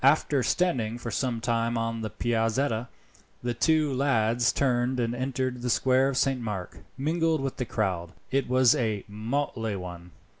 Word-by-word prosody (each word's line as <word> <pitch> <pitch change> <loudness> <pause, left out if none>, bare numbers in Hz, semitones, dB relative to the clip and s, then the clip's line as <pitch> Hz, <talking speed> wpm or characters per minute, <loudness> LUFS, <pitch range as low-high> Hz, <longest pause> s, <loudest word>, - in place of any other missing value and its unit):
After 140 0 +4
standing 120 -8 +1
for 120 -1 -5
some 120 0 -1
time 115 0 0
on 115 0 -2
the 110 - -3
Piazzetta, 115 +2 0 0.6
the 120 0 0
two 155 +3 +2
lads 120 -3 +2
turned 125 -1 +1
and, 115 -1 0
entering 130 0 -2
the 125 - -2
square 130 +2 +3
of 135 - -2
Saint 135 -3 +1
Mark, 105 -6 -5 0.2
mingled 160 +2 +1
with 135 -1 -3
the 125 - -2
crowd. 90 -7 -2 0.2
It 135 -1 +1
was 130 -1 +5
a 110 -4 -1
motley 115 0 -2
one. 90 -2 -7
120 Hz, 160 wpm, -27 LUFS, 115-135 Hz, 0.6 s, was